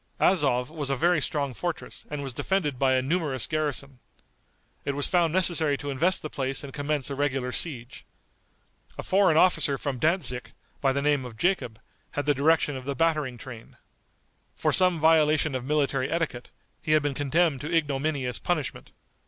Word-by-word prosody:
Azov 135 -8 +2
was 150 -4 -3
a 135 - +1
very 170 +3 +2
strong 140 -2 -2
fortress 175 +5 -5
and 150 -1 -4
was 135 -2 -5
defended 150 -3 -1
by 135 -1 +3
a 130 - +1
numerous 145 -4 -1
garrison. 145 -4 -3 0.8
It 140 -1 -2
was 145 - +1
found 175 -3 +2
necessary 165 -5 +4
to 145 0 -5
invest 170 +7 +3
the 155 - -4
place 135 +1 -3
and 140 -2 -9
commence 145 -1 -2
a - - -3
regular 135 -3 -1
siege. 125 -6 -4 0.9
A - - -5
foreign 190 -4 +3
officer 165 -5 +3
from 135 -3 -4
Dantzic, 140 -6 0 0.3
by 135 - +3
the 140 +1 -1
name 145 -2 +2
of 120 -3 -9
Jacob, 125 - -1 0.3
had 145 - -2
the 145 - +3
direction 145 +1 +2
of 130 -1 -7
the 140 0 -3
battering 150 -4 0
train. 115 -1 -11 0.8
For - - 0
some 180 -3 +4
violation 155 -1 +3
of 130 -1 -3
military 140 -2 0
etiquette, 165 -7 -3 0.3
he 155 - 0
had 155 -2 +3
been 145 -1 -1
condemned 145 +1 +1
to 150 - -5
ignominious 145 -4 -1
punishment. 155 -7 -3
145 Hz, 175 wpm, -26 LUFS, 135-160 Hz, 0.9 s, necessary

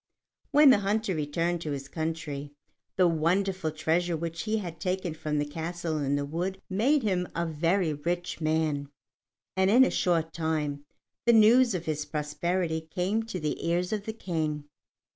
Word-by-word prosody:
When 295 -2 +7
the 230 - +5
hunter 205 0 0
returned 165 +3 -1
to 150 -3 -3
his 135 -1 -5
country, 150 -3 -4 0.4
the 185 -1 +4
wonderful 175 +2 +1
treasures 165 +3 0
which 165 0 -4
he 220 0 +1
had 175 -6 -6
taken 185 -2 -2
from 155 -1 -3
the 145 - +1
castle 165 +1 -3
in 140 -1 0
the 145 0 -1
wood 180 +6 -3
made 260 +9 +2
him 185 -4 0
a 170 - 0
very 165 +2 +1
rich 170 +4 -3
man, 155 -2 0 0.7
and 190 0 +3
in 245 +5 +7
a - - 0
short 165 -2 +1
time 150 -3 -2 0.4
the 235 - +7
news 230 +1 +6
of 175 -1 -4
his 150 -1 -2
prosperity 160 +3 -1
came 180 +7 -1
to 210 -5 -5
the 155 -2 -3
ears 175 +3 0
of 210 -1 -3
the 220 - -4
King. 160 -8 -2
170 Hz, 170 wpm, -28 LUFS, 155-190 Hz, 0.7 s, When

